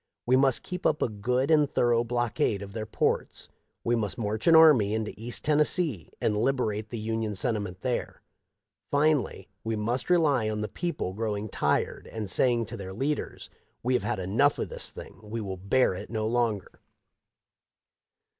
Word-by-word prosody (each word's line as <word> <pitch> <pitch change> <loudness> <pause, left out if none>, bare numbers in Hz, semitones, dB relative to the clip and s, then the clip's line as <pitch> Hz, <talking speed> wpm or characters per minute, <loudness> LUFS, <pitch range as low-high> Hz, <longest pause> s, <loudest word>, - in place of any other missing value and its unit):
We 125 - +4
must 135 -1 +3
keep 180 0 -6
up 155 - +1
a - - 0
good 125 +7 0
and 150 -3 +4
thorough 120 -1 +2
blockade 120 -4 0
of 100 0 -10
their 110 -1 -4
ports. - - -1 0.3
We 120 - +2
must 110 +1 -2
march 110 -1 -3
an 165 - +7
army 135 -11 +6
into 110 -1 -3
east 120 +3 -4
Tennessee 150 - +1
and 105 -1 0
liberate 110 -5 0
the 120 - -5
Union 110 -1 -2
sentiment 100 -4 -2
there. 125 -2 -3 0.7
Finally 145 -9 +1 0.2
we 110 0 -1
must 120 +7 -1
rely 145 -10 +3
on 105 0 -2
the 105 - -2
people 170 - -3
growing 105 0 -3
tired - - -1
and 105 -4 -4
saying 120 0 +2
to - - -7
their 95 -1 -7
leaders: 140 +8 -3 0.2
' - - -44
We 125 +2 +1
have 125 - +2
had - - -2
enough 100 +10 +2
of - - -3
this - - -4
thing, - - -11
we 110 +2 -5
will 100 -3 -4
bear 100 +5 +2
it 95 +3 -7
no 110 -1 -2
longer.' 115 -3 -1
115 Hz, 175 wpm, -28 LUFS, 105-130 Hz, 0.7 s, an